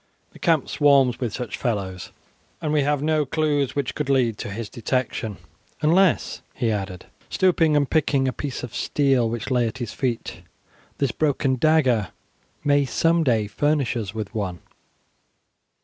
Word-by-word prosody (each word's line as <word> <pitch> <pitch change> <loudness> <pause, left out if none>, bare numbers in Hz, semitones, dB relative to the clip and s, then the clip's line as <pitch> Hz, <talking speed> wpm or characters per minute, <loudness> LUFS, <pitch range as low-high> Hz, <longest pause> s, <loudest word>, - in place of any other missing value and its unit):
The - - -16
camp 165 -6 +2
swarms 140 -5 +3
with 120 -4 -2
such 120 -3 -5
fellows, 95 -6 -3 0.5
and 155 -3 -2
we 150 - +3
have 145 0 0
no 155 0 +2
clue 145 0 +1
which 140 -1 -3
could 150 -2 -3
lead 125 -5 +2
to - - -5
his 110 +2 -5
detection, 115 -3 -2 0.4
unless," 175 +4 +2
he 120 -5 0
added, 95 -3 -4 0.2
stooping 165 -4 +3
and 145 -1 +3
picking 140 -3 +1
a 130 - -1
piece 140 -2 -5
of 125 - -7
steel 135 -5 +1
which 115 +3 -4
lay 120 -2 +2
at 115 - -5
his 120 -2 -5
feet, 125 -4 -3 0.6
"this 140 -4 0
broken 140 -2 +1
dagger 130 - +3 0.6
may 145 0 +3
some 165 +6 +2
day 115 -7 +2
furnish 145 +5 0
us 110 -5 -3
with 110 -1 -6
one. 95 -6 -3
130 Hz, 160 wpm, -23 LUFS, 115-150 Hz, 0.6 s, swarms